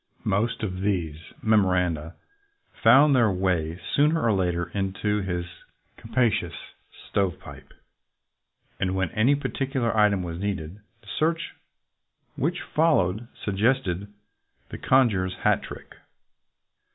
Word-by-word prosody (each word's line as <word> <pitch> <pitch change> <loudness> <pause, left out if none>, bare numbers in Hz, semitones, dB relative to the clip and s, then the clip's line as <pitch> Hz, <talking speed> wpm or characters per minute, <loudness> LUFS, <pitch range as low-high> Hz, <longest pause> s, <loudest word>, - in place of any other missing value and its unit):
Most 115 +4 0
of 95 -3 -3
these 90 -7 -1 0.3
memo 110 -3 +4
randa 85 -3 -1 0.7
found 135 +5 +6
their 120 -4 +4
way 90 -3 -1
sooner 150 +3 +3
or 115 - +3
later 90 -2 -1
into 100 +1 -1
his 90 -2 -3 0.5
capacious 115 0 0 0.5
"stovepipe," 95 -4 -3 1.1
and 95 0 0
when 95 -3 -1
any 125 +7 +3
particular 135 -4 -2
item 105 -3 +3
was 85 -1 -5
needed, 95 -2 -4 0.2
the 105 - -22
search 165 +1 0 0.8
which 170 +6 -1
followed 120 - +1 0.2
sug 100 -2 -2
gested 105 -5 +1 0.6
the - - -8
conjurer's 100 -9 +2
hat - - +3
trick. - - -10
100 Hz, 115 wpm, -25 LUFS, 90-120 Hz, 1.1 s, found